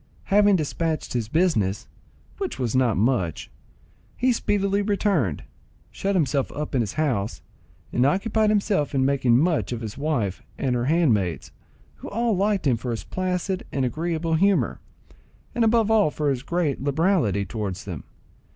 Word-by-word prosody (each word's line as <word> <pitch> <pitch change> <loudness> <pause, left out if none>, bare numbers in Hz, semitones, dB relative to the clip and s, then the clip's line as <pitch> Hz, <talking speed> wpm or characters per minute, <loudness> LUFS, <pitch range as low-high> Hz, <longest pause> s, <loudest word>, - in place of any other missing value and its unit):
Having 205 -1 +6
despatched 160 0 -2
his 120 -3 -1
business, 115 - +1 0.5
which 390 -2 -3
was 125 -3 -2
not 125 -5 +2
much, 100 - 0 0.7
he 255 +1 +2
speedily 200 -2 0
returned, 195 - 0 0.5
shut 200 0 -2
himself 145 -5 +1
up 150 +1 -5
in 130 - +2
his 105 - -3
house, 120 -10 -1 0.5
and 125 - +2
occupied 210 - +2
himself 200 -9 +1
in 130 -1 +2
making 130 -4 +3
much 160 +1 +1
of 120 -1 -3
his 110 +2 -6
wife 130 - -1 0.2
and 130 -3 0
her 120 0 0
handmaids, 120 - +1 0.5
who - - -8
all 230 0 0
liked 200 0 0
him 125 -4 +3
for 125 +2 -5
his 115 -2 -3
placid 185 0 -2
and 135 -2 0
agreeable 165 +4 -2
humour, 195 +4 +2 0.7
and 240 - +1
above 225 -1 +3
all 215 -7 +4
for 150 -1 -1
his 130 -2 -2
great 165 -3 -1
liberality 140 - +1
towards 100 -2 -5
them. 90 -8 -6
150 Hz, 155 wpm, -24 LUFS, 120-195 Hz, 0.7 s, Having